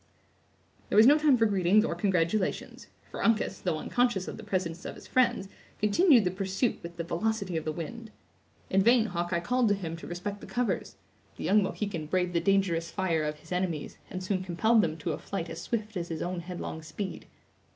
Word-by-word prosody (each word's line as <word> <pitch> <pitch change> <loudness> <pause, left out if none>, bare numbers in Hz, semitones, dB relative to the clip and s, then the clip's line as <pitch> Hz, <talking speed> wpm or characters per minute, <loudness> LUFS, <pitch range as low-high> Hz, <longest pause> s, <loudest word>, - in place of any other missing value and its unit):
There - - -1
was 215 +2 +8
no 290 +4 +7
time 295 -4 +5
for 225 - +4
greetings 200 +1 +3
or - - -1
congratulations; 185 0 -1 0.2
for - - -4
Uncas, 220 -4 +1
though 175 -4 0
unconscious 240 +1 0
of - - -5
the 220 - -10
presence 180 -4 -2
of - - -6
his - - -13
friends, 240 -6 +2 0.3
continued 240 - +5
the 180 - 0
pursuit 195 +5 -1
with 170 0 -9
the 170 - -2
velocity 190 +2 -1
of 160 - -2
the 155 - 0
wind. 220 +9 -7 0.6
In 195 - +4
vain 235 +2 +5
Hawkeye 175 -3 -1
called 250 +6 +2
to 205 - +3
him 170 -4 -5
to - - -9
respect 200 +4 -5
the - - -9
covers; 245 -1 -2 0.4
the - - -6
young 210 +1 +4
Mohican 190 -5 -3
braved 180 +1 0
the 170 - +2
dangerous 190 -4 +1
fire 170 -4 0
of 150 0 -2
his - - -17
enemies, 180 -4 -2
and 185 0 -5
soon 185 0 -1
compelled 220 +6 +3
them 160 -4 -1
to 165 0 -3
a - - -4
flight 170 -4 -5
as 165 +1 -6
swift 220 0 -3
as 175 -2 -3
his 165 -2 -4
own 180 0 -3
headlong 170 -2 -6
speed. 190 +5 -6
190 Hz, 205 wpm, -29 LUFS, 170-215 Hz, 0.6 s, was